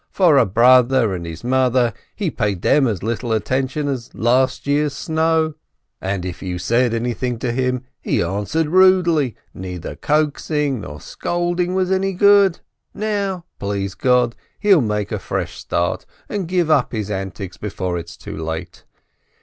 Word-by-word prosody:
but - - -39
for 175 -7 +5
a 120 - +3
brother 120 +1 +4
and 85 -2 -5
his 85 0 -8
mother, 125 -2 +2 0.2
he 195 -7 -2
paid 105 -6 -2
them 145 -3 +4
as 105 -6 -2
much 115 +3 -2
attention 130 +5 -1
as 130 -4 -3
last 125 +3 +1
year's 145 0 +1
snow, 160 0 +1 0.5
and, 95 -1 -2
if 90 -2 -6
you 90 -2 -3
said 115 +7 +1
anything 120 +1 -2
to 120 +1 -2
him, 125 0 -1 0.2
he - - 0
answered 100 - -1
rudely, 175 - +4 0.2
and - - -10
neither 90 -2 -6
coaxing 150 -3 0
nor 75 -4 -8
scolding 175 - -2
was 185 0 +1
any 190 0 +1
good. 200 -1 +5 0.3
Now, 200 -4 -2
please 100 -1 -2
God, 125 +2 +2 0.2
he'll 195 -6 +4
make 105 -3 -2
a - - -2
fresh - - -4
start, 85 0 -2 0.2
and 195 -4 -3
give 175 -3 +1
up 140 -6 +2
his 105 -2 -3
antics 95 -1 -5
before 95 -4 -3
it's 85 0 -10
too - - -8
late. 80 0 -6
125 Hz, 160 wpm, -20 LUFS, 100-160 Hz, 0.5 s, for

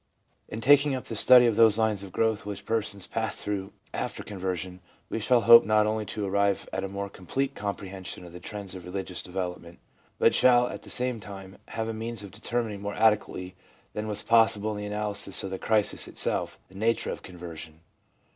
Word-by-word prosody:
In 110 - -6
taking 145 +2 +5
up 130 - -5
the 115 - -6
study 125 +3 +7
of 115 -3 +2
those 110 -1 +6
lines 110 -3 +1
of 100 -2 -9
growth 110 0 0
which 100 0 -6
persons 100 -4 -2
pass 110 -1 -3
through 100 -1 -4 0.2
after - - -4
conversion, 95 -2 -4 0.3
we - - -2
shall 120 +2 +3
hope 115 0 +9
not 105 +1 +3
only 110 -1 -1
to 105 +2 -3
arrive 100 0 +1
at 95 0 -2
a - - -2
more 100 +1 -4
complete 135 +9 -3
compre 100 -3 -5
hension 95 -2 -7
of 85 - -12
the 90 - -8
trends 100 -2 -7
of 95 -2 -9
religious 90 0 -5
development, 90 -2 -5 0.4
but - - +4
shall, 125 -1 +5
at - - -7
the - - -13
same 125 -2 0
time, 95 -2 -10
have 110 0 -3
a 115 - -3
means 110 -1 -4
of 100 - -9
determining 115 -4 -3
more 100 0 -4
adequately 105 -4 +1 0.4
than 105 +1 -4
was 105 -1 -1
possible 110 -2 +3
in 105 - -4
the 105 0 -5
analysis 105 -1 -1
of 95 - -5
the 95 - -4
crisis 110 -2 +1
itself, - - -1
the - - -21
nature 110 +4 0
of - - -6
conversion. 85 -3 -9
105 Hz, 205 wpm, -27 LUFS, 95-110 Hz, 0.4 s, hope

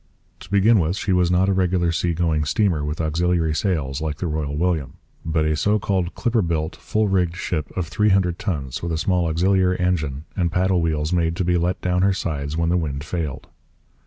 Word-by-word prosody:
To 85 - -13
begin 100 +3 +4
with, 85 +1 0
she 100 - 0
was 90 -1 +3
not 90 +2 +3
a 100 - +2
regular 90 -2 +1
sea 85 0 -1
going 80 -3 +1
steamer 85 0 +1
with 75 +1 -3
auxiliary 80 0 +1
sails 75 -6 -1
like 75 -2 -3
the 90 - -4
Royal 75 -3 -2
William, 80 -5 0 0.3
but 80 -1 0
a 75 0 +1
so 105 +7 +2
called 95 -3 -1
clipper 120 -1 +1
built, 80 -3 -2
full 110 0 -1
rigged 90 -3 +1
ship 80 -6 -3
of 90 -2 -1
three 105 +5 +1
hundred 95 -3 +2
tons 75 - -3
with 85 - -3
a 80 - -1
small 90 0 +1
auxiliary 90 +3 +2
engine 80 -6 -1
and 85 -3 0
paddle 90 0 +2
wheels 80 0 -1
made 85 -2 +1
to 90 - -1
be 90 0 +2
let 85 +1 0
down 90 0 +1
her 100 +1 +3
sides 75 -4 -3
when 85 0 +1
the 90 - +2
wind 70 -4 -3
failed. 80 -4 -4
85 Hz, 215 wpm, -22 LUFS, 80-90 Hz, 0.3 s, begin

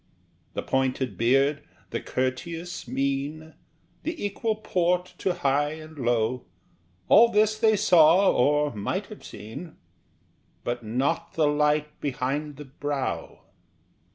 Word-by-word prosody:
The - - -2
pointed 130 -4 0
beard, 135 +7 +2 0.3
the - - -2
courteous 165 +7 -3
mien, 140 +5 -2 0.5
The 325 -9 -4
equal 215 +2 -1
port 180 -3 0
to 185 -2 0
high 145 -2 +1
and 155 0 -10
low, 120 0 0 0.6
All 230 +2 +7
this 215 -1 +3
they 220 -1 +4
saw 185 -2 +5
or 150 +2 +2
might 105 -2 -2
have - - -11
seen 135 +11 -9 0.9
But 120 0 -3
not 130 +9 -1
the 160 - +2
light 150 0 +1
behind 145 +2 -2
the 150 +1 -9
brow! 140 0 -4
150 Hz, 120 wpm, -26 LUFS, 130-175 Hz, 0.9 s, All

